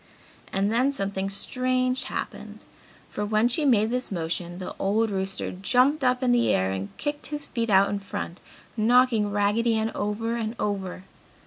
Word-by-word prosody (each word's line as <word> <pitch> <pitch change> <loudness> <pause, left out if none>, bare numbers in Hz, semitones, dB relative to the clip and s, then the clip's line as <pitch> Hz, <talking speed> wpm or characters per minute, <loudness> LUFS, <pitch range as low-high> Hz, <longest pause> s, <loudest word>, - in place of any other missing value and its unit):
And 195 +2 +1
then 250 +5 +2
something 195 -5 -2
strange 255 +5 0
happened, - - -6 0.5
for 210 - -4
when 215 +2 +2
she 270 +5 0
made 225 -4 +3
this 250 -2 -2
motion 175 0 -3
the 185 - -6
old 215 +3 +1
rooster 190 0 -2
jumped 255 +10 +2
up 250 0 +2
in 250 - +3
the 240 -1 +3
air 95 0 +1
and 95 +1 -4
kicked 290 0 -3
his 295 -1 -5
feet 230 -2 -2
out 195 0 +5
in 205 - -1
front, 190 -3 -6 0.4
knocking 230 -1 +3
Raggedy 205 +3 +2
Ann 220 0 0
over 225 +3 -2
and 225 0 -3
over. 190 -3 -3
220 Hz, 165 wpm, -26 LUFS, 195-250 Hz, 0.5 s, out